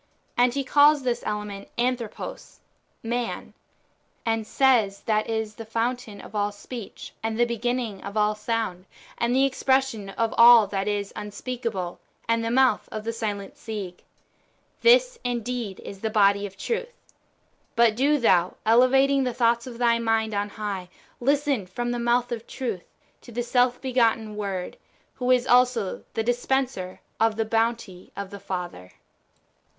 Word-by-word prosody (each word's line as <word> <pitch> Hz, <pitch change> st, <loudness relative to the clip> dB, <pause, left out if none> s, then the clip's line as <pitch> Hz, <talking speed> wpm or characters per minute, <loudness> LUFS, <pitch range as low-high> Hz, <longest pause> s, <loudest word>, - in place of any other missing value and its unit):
And 245 Hz, +1 st, +3 dB
he 280 Hz, -, 0 dB
calls 290 Hz, +1 st, +5 dB
this 245 Hz, -2 st, -1 dB
element 210 Hz, -1 st, -4 dB
Anthropos 240 Hz, -2 st, -3 dB, 0.5 s
(^lan), 235 Hz, 0 st, -3 dB, 0.7 s
and 225 Hz, -1 st, 0 dB
says 230 Hz, -7 st, +3 dB
that 215 Hz, 0 st, 0 dB
is 220 Hz, -1 st, -2 dB
the 225 Hz, -, -8 dB
fountain 230 Hz, -1 st, -3 dB
of -, -, -12 dB
all 205 Hz, -1 st, 0 dB
speech, 210 Hz, +2 st, -9 dB
and 220 Hz, 0 st, -2 dB
the 240 Hz, -, +4 dB
beginning 235 Hz, -3 st, -2 dB
of 200 Hz, +2 st, -6 dB
all 210 Hz, 0 st, +3 dB
sound, 210 Hz, -4 st, -3 dB, 0.3 s
and 235 Hz, +1 st, +1 dB
the 270 Hz, +1 st, +4 dB
expression 265 Hz, -6 st, 0 dB
of 225 Hz, +3 st, -1 dB
all 235 Hz, -2 st, +9 dB
that 195 Hz, 0 st, -3 dB
is 205 Hz, -1 st, -2 dB
unspeakable, 210 Hz, -3 st, -4 dB, 0.3 s
and 230 Hz, 0 st, +1 dB
the 230 Hz, -, -1 dB
mouth 255 Hz, -2 st, +3 dB
of 215 Hz, -, -5 dB
the 230 Hz, +1 st, -3 dB
silent 205 Hz, -3 st, -4 dB
Sige. 205 Hz, -6 st, -7 dB, 0.8 s
This -, -, +5 dB
indeed 240 Hz, -4 st, -3 dB
is 195 Hz, -, -9 dB
the 220 Hz, -, -1 dB
body 200 Hz, -1 st, +3 dB
of 190 Hz, -1 st, -15 dB
Truth. 480 Hz, -, -3 dB, 0.8 s
But 230 Hz, -2 st, +4 dB
do 285 Hz, +5 st, +3 dB
thou, 185 Hz, -8 st, +3 dB
elevating 265 Hz, +4 st, +4 dB
the 250 Hz, -2 st, -2 dB
thoughts 235 Hz, 0 st, +2 dB
of 240 Hz, -2 st, -8 dB
thy 235 Hz, -1 st, +3 dB
mind 225 Hz, -1 st, 0 dB
on 205 Hz, 0 st, -1 dB
high, 200 Hz, -4 st, -5 dB, 0.3 s
listen 280 Hz, -5 st, +1 dB
from 240 Hz, +6 st, -3 dB
the 240 Hz, -, -2 dB
mouth 240 Hz, +1 st, +1 dB
of 230 Hz, -1 st, -5 dB
Truth 225 Hz, -10 st, -4 dB, 0.4 s
to -, -, -13 dB
the 240 Hz, +1 st, -2 dB
self 245 Hz, +1 st, +2 dB
begotten 230 Hz, -4 st, +1 dB
Word, 195 Hz, -3 st, -4 dB, 0.4 s
who 250 Hz, 0 st, -3 dB
is 250 Hz, -1 st, +4 dB
also 245 Hz, -5 st, +2 dB
the 225 Hz, -, 0 dB
dispenser 245 Hz, -5 st, -1 dB, 0.2 s
of 225 Hz, -1 st, +3 dB
the 225 Hz, 0 st, 0 dB
bounty 225 Hz, -4 st, -1 dB
of 200 Hz, -1 st, -5 dB
the 200 Hz, -, -8 dB
Father. 175 Hz, -, -6 dB
230 Hz, 155 wpm, -25 LUFS, 205-245 Hz, 0.8 s, all